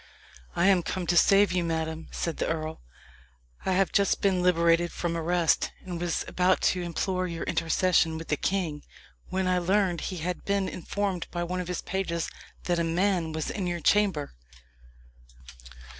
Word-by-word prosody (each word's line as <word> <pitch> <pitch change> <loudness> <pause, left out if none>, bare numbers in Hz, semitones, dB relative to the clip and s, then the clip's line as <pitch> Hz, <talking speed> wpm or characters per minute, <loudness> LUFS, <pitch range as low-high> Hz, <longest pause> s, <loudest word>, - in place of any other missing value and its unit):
"I 170 - +2
am 195 -2 +5
come 180 +2 -3
to 175 - +1
save 195 +2 +5
you, 180 0 +1
madame," 160 -1 -3
said 165 -2 -3
the - - -1
earl. 160 -1 -3 0.9
"I 190 - +2
have 190 0 +2
been - - -25
just 200 0 +2
liberated 175 -2 +3
from 170 -1 -2
arrest, 170 0 +1
and 175 -2 -5
was 175 -1 -1
about 185 +1 +2
to 180 - -4
implore 185 +2 -1
your 170 -1 -4
intercession 165 0 +2
with 165 - -8
the 150 - +2
king, 165 -3 -1 0.5
when 185 0 -1
I 180 0 +2
learned 185 -1 +1
he 185 - -4
had 175 +2 -3
been 200 -1 0
informed 190 0 -3
by 175 -1 -3
one 180 +1 -3
of 180 - -6
his 180 -1 -3
pages 170 -3 -2 0.3
that 175 -1 0
a - - +2
man 170 0 +1
was 155 0 -3
in 190 -4 -3
your 175 -1 -2
chamber. 190 -5 +2
175 Hz, 175 wpm, -27 LUFS, 165-185 Hz, 0.9 s, am